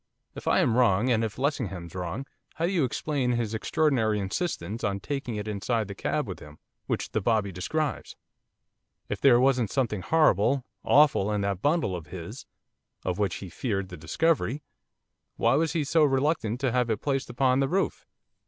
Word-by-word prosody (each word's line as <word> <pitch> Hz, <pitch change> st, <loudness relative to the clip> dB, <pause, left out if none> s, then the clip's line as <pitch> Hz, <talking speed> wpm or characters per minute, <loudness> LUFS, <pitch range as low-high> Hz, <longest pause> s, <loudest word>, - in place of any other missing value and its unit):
If -, -, -9 dB
I -, -, +4 dB
am 115 Hz, -, +2 dB
wrong, 120 Hz, 0 st, +3 dB
and 115 Hz, -1 st, +2 dB
if 110 Hz, -2 st, -3 dB
Lessingham's 105 Hz, -, -2 dB
wrong, 90 Hz, +8 st, -4 dB, 0.3 s
how 165 Hz, -, 0 dB
do 175 Hz, -, 0 dB
you 170 Hz, -8 st, +2 dB
explain 130 Hz, -1 st, -1 dB
his 115 Hz, -2 st, -1 dB
extraordinary 115 Hz, -4 st, +1 dB
insistence 105 Hz, -, -3 dB
on 100 Hz, -1 st, 0 dB
taking 135 Hz, +1 st, -4 dB
it 105 Hz, 0 st, -4 dB
inside 110 Hz, +1 st, -1 dB
the 100 Hz, -, -6 dB
cab -, -, -2 dB
with -, -, -6 dB
him, 75 Hz, 0 st, -13 dB, 0.3 s
which -, -, -2 dB
the 110 Hz, -, 0 dB
bobby 105 Hz, -2 st, +1 dB
describes? 140 Hz, -, -3 dB, 0.9 s
If -, -, -3 dB
there 125 Hz, -3 st, +6 dB
wasn't 125 Hz, -4 st, +3 dB
something 115 Hz, -6 st, -1 dB
horrible, 135 Hz, -, +3 dB, 0.2 s
awful 140 Hz, -8 st, +4 dB
in 105 Hz, -1 st, 0 dB
that 100 Hz, -2 st, -2 dB
bundle 145 Hz, -, +1 dB
of 80 Hz, -3 st, -7 dB
his, -, -, -8 dB, 0.6 s
of 90 Hz, +1 st, -1 dB
which 100 Hz, -3 st, 0 dB
he 95 Hz, -, -7 dB
feared 100 Hz, -2 st, -2 dB
the 90 Hz, -, -7 dB
discovery, 135 Hz, -, 0 dB, 0.7 s
why -, -, +2 dB
was 160 Hz, 0 st, +1 dB
he 160 Hz, -3 st, +1 dB
so 155 Hz, +3 st, +3 dB
reluctant 135 Hz, -4 st, +1 dB
to 130 Hz, -3 st, +1 dB
have 125 Hz, 0 st, +1 dB
it 110 Hz, -2 st, -2 dB
placed 135 Hz, -3 st, -1 dB
upon 130 Hz, +1 st, +2 dB
the 135 Hz, -, +2 dB
roof? 195 Hz, +4 st, -1 dB
120 Hz, 180 wpm, -27 LUFS, 100-140 Hz, 0.9 s, there